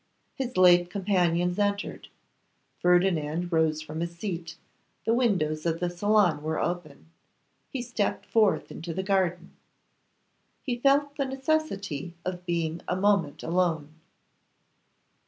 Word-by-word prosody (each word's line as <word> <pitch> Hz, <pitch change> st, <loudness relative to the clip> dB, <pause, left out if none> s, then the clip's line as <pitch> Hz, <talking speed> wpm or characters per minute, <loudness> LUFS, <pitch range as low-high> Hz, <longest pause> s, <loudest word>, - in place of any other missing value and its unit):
His 255 Hz, -5 st, -4 dB
late 175 Hz, -1 st, +6 dB
companions 180 Hz, -2 st, +1 dB
entered. 205 Hz, 0 st, -1 dB, 0.7 s
Ferdinand 175 Hz, -2 st, +2 dB
rose 160 Hz, -2 st, +1 dB
from 155 Hz, +1 st, -6 dB
his 170 Hz, 0 st, -3 dB
seat; 170 Hz, -4 st, -5 dB, 0.5 s
the 225 Hz, -, +3 dB
windows 180 Hz, -11 st, +1 dB
of 165 Hz, -1 st, 0 dB
the 175 Hz, -1 st, -1 dB
salon 195 Hz, -3 st, +2 dB
were 155 Hz, +1 st, -2 dB
open; 165 Hz, -2 st, -4 dB, 0.6 s
he 260 Hz, -4 st, -4 dB
stepped 230 Hz, -4 st, -2 dB
forth 215 Hz, -3 st, +2 dB
into 165 Hz, 0 st, -6 dB
the 190 Hz, -, -2 dB
garden. 185 Hz, -3 st, 0 dB, 1.1 s
He 245 Hz, -3 st, -2 dB
felt 285 Hz, +2 st, +2 dB
the 275 Hz, -, 0 dB
necessity 260 Hz, -, -2 dB
of 180 Hz, 0 st, -5 dB
being 165 Hz, -1 st, -1 dB
a 180 Hz, -, 0 dB
moment 185 Hz, -7 st, +1 dB
alone. 165 Hz, -3 st, 0 dB
180 Hz, 120 wpm, -27 LUFS, 165-205 Hz, 1.1 s, late